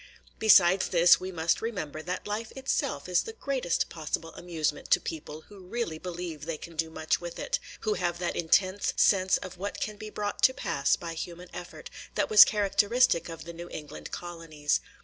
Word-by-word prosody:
Besides 190 -3 +6
this, 175 0 +6
we 185 +1 -5
must 170 -1 0
remember 170 -10 -4
that 180 +3 -4
life 215 +2 -4
itself 265 - -2
is 180 -1 +3
the 450 - -7
greatest 275 - -1
possible 165 0 -4
amusement 160 -4 -3
to - - +5
people 155 -1 -7
who 205 +4 -15
really 185 -7 -3
believe 170 -4 -6
they 165 -2 -3
can 165 +2 -11
do 160 0 -1
much 160 +1 -1
with 175 -1 -7
it, - - -1
– - - -14
who 435 - +1
have 175 - -1
that 175 -1 -2
intense 185 +4 +2
sense 190 -1 +4
of 185 -1 -9
what 200 +2 -4
can 215 -1 -3
be 215 +1 -7
brought 205 -1 -4
to 260 - +5
pass 140 0 +1
by 170 -1 -6
human 175 +2 -7
effort, 180 0 -9 0.2
that - - 0
was 210 -1 +11
characteristic 205 -2 +2
of 165 -1 -8
the 170 - -8
New 170 +1 -9
England 150 -1 -8
colonies. 165 -4 -2
175 Hz, 190 wpm, -28 LUFS, 165-205 Hz, 0.2 s, was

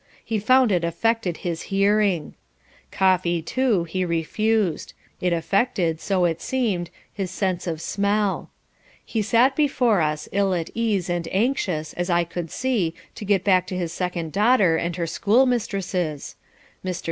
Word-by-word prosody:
He 220 -2 -1
found 255 +2 +4
it 175 -3 +1
affected 190 +1 0
his 170 -2 -2
hearing. 195 -4 +2 0.6
Coffee, 185 -2 +2
too, 245 -7 +1
he 185 +3 -2
refused. 180 +3 0 0.3
It 180 - 0
affected, 170 -1 0
so 190 -3 +1
it 165 -1 -1
seemed, 210 -10 -1 0.2
his 195 -2 -3
sense 185 -2 -2
of 160 -2 -2
smell. 200 +2 -1 0.6
He 225 - -1
sat 245 +5 +3
beside 255 - +2
us, 150 - -9
ill 195 -2 +1
at 165 -2 -3
ease, 215 -6 0
and 175 -2 -2
anxious, 190 - 0
as 175 +1 -3
I 175 0 +3
could 170 0 -5
see, 210 -10 -1 0.2
to 210 - -8
get 195 -2 +2
back 185 -2 +3
to 185 - -4
his 170 -2 -3
second 175 -3 -3
daughter 205 - +4
and 170 +1 -2
her 170 - -2
schoolmistresses. 200 - 0 0.5
Mr. 185 -2 -3
185 Hz, 150 wpm, -23 LUFS, 170-215 Hz, 0.6 s, found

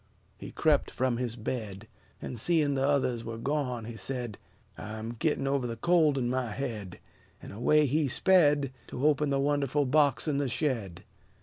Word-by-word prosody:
He - - -8
crept - - +2
from 130 -2 -1
his 120 -2 -3
bed; 110 -3 -5 0.4
And, 120 - -5
seeing 155 +1 +2
the 135 0 +1
others 130 -5 +1
were 115 0 -6
gone, 125 -2 -2
he 115 0 -7
said, 120 -3 -4 0.4
"I'm 110 +2 -6
gittin' 150 -3 0
over 135 -2 0
the 115 - -4
cold'n 155 -7 +2
my 125 -1 -1
head." 105 -6 -5 0.4
And - - -10
away 150 +8 +3
he 145 +2 +1
sped, 145 -4 +3
To 130 - -3
open 150 -1 +3
the 140 -1 +1
wonderful 145 0 +1
box 140 0 +2
in 145 -2 +1
the 140 -2 -1
shed. 115 - -2
130 Hz, 170 wpm, -29 LUFS, 115-145 Hz, 0.4 s, away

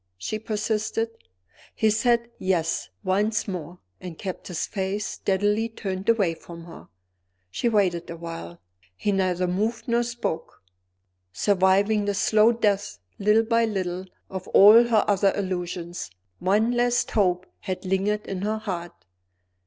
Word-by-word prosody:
she 215 - -4
persisted. 220 +1 -1 0.6
He 220 -1 +3
said 235 +2 +1
"Yes" 175 -3 0
once 210 +4 +1
more 180 -2 -6 0.2
and 175 -3 -8
kept 185 -2 -6
his 175 -3 -2
face 195 +1 -3
steadily 205 +3 0
turned 195 -2 -4
away 200 -7 +3
from 170 +1 -11
her. 170 - -12 0.6
She 235 - 0
waited 190 -6 +1
a 170 - -6
while. 165 - -8 0.4
He 205 - -1
neither 185 -2 +1
moved 210 +6 -1
nor 235 0 +2
spoke. 235 - -4 0.7
Surviving 200 - +2
the 205 0 0
slow 215 +3 +4
death 205 -4 0 0.2
little 210 +2 +4
by 230 0 +3
little 185 -4 -3 0.2
of 190 -1 -7
all 215 +4 +8
her 225 -3 +3
other 200 -1 +3
illusions, 180 - -4 0.3
one 210 +6 +2
last 245 0 +1
hope 185 -3 +1
had 185 0 -5
lingered 195 +3 0
in 190 -2 -4
her 215 +2 -1
heart. 175 - -6
200 Hz, 135 wpm, -25 LUFS, 180-220 Hz, 0.7 s, all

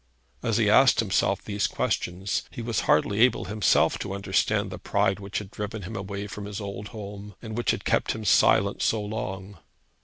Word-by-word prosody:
As - - 0
he - - +3
asked - - +6
himself - - +1
these 100 -1 -1
questions, 90 +2 -1
he 120 - -7
was 115 -2 -1
hardly 100 +6 +3
able 125 +2 +4
himself 105 +2 +2
to 95 - -4
understand 100 -2 0
the - - -7
pride 95 +1 +1
which 100 0 -5
had 105 -2 -5
driven 105 0 -5
him 105 +6 -7
away 100 0 -5
from 100 0 -7
his 105 0 -5
old 100 0 -6
home, 105 -2 -9
and 110 -2 -7
which 120 - -1
had - - 0
kept - - +1
him 110 -1 -7
silent 100 0 +4
so 110 - +2
long. 100 -3 -5
100 Hz, 190 wpm, -26 LUFS, 100-105 Hz, -, asked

